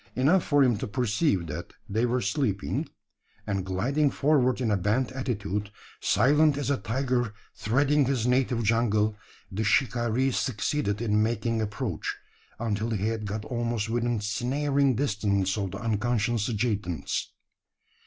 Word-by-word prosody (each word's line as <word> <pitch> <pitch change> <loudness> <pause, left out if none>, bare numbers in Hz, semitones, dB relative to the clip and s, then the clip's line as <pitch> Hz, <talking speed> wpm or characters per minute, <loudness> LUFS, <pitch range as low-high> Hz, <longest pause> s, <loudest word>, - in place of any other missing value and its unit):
Enough 160 +8 +3
for 145 -1 +4
him 120 -5 +2
to 130 - -3
perceive 110 - +1
that 80 +3 -6
they 110 +3 +1
were 125 +1 0
sleeping; 115 - -1 0.6
and, 100 -2 -1
gliding 125 +11 +1
forward 135 -3 +2
in 120 -4 0
a - - +3
bent 105 +8 0
attitude, 105 -6 -3 0.3
silent 145 +7 +3
as 145 -1 -1
a 140 - +2
tiger 120 0 -1 0.2
threading 140 +5 +2
his 130 -3 0
native 125 -1 +2
jungle, 110 -1 +2 0.4
the 105 +3 -2
shikaree 120 +3 +2
succeeded 115 -2 -1
in 105 -2 +2
making 115 0 0
approach 105 -2 -3 0.4
until 110 -1 -1
he 110 -1 0
had 110 -2 -3
got 105 +1 -4
almost 115 -2 -2
within 120 -1 0
snaring 135 +5 +1
distance 100 -6 0
of 100 -3 -2
the 95 - -6
unconscious 115 +1 0
adjutants. 105 -6 -2
115 Hz, 140 wpm, -27 LUFS, 105-130 Hz, 0.6 s, for